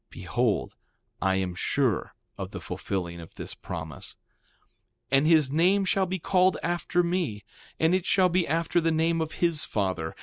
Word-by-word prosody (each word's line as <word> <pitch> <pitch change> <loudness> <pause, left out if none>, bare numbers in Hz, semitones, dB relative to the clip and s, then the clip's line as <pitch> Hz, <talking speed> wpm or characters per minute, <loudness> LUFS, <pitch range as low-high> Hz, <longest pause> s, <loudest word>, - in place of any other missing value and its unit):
Behold, - - -1 0.5
I 95 0 +2
am 95 -1 -1
sure 120 +4 0 0.2
of - - -5
the - - -7
fulfilling 85 -3 -4
of 85 - -12
this - - -7
promise; 80 -5 -7 1.0
3:15 135 - +6
And 150 - +1
his 155 -5 +4
name 185 +6 +3
shall 190 0 +1
be 190 +2 -2
called 185 +1 +2
after 175 0 0
me; 170 - -1 0.4
and 160 +2 +3
it 185 -1 0
shall 185 -2 +4
be 180 0 +1
after 165 +2 +1
the 165 0 +2
name 165 +1 +1
of 160 0 -3
his 170 -3 +2
father. 95 -6 -2
160 Hz, 170 wpm, -27 LUFS, -, 1.0 s, 3:15